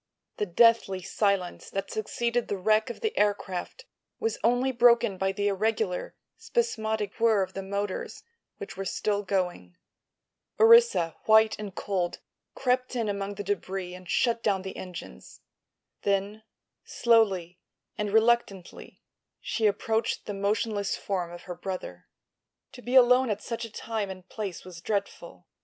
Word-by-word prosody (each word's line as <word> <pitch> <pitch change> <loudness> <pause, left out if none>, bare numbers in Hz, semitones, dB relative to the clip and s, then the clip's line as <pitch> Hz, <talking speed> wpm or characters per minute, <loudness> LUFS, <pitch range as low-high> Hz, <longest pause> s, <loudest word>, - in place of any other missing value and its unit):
The 210 - -1
deathly 195 -1 +3
silence 200 -3 -1
that 195 - -4
succeeded 235 +2 -1
the 200 - -2
wreck 215 +5 +2
of 240 - -7
the 440 -1 -1
aircraft 205 - -1 0.3
was 450 0 -2
only 245 +3 +2
broken 235 -4 +4
by 190 0 +1
the 205 +1 -1
irregular, 205 -1 -1 0.2
spasmodic 220 - -1
whirr 225 -4 +4
of 185 - -7
the 195 - -4
motors, 200 0 -4 0.3
which - - -8
were 195 - -4
still 205 +2 -1
going. 180 - -2 0.8
Orissa, 455 - +6
white 220 0 +6
and 205 -3 -7
cold, 180 -3 -2 0.4
crept 255 -1 0
in 230 -3 -1
among 200 0 -3
the 205 - -5
debris 190 -2 -3
and 180 -1 -11
shut 235 -2 +1
down 195 -4 0
the 190 - -6
engines. 175 - -9 0.6
Then, 200 +2 -1 0.4
slowly 195 -7 +2 0.4
and 210 -1 -2
reluctantly, 220 -4 0 0.4
she 220 -2 0
approached 220 +2 -1
the 205 - -4
motionless 205 +1 -1
form 180 -4 -3
of 175 0 -10
her 180 - -6
brother. 185 +1 -7 0.6
To 265 -2 -12
be 245 +2 -3
alone 250 0 +6
at 210 -1 -2
such 230 0 -4
a 225 - -10
time 220 -2 -3
and 185 -1 -9
place 200 -6 -6
was 175 -2 -10
dreadful. 185 - -4
205 Hz, 145 wpm, -27 LUFS, 190-230 Hz, 0.8 s, Orissa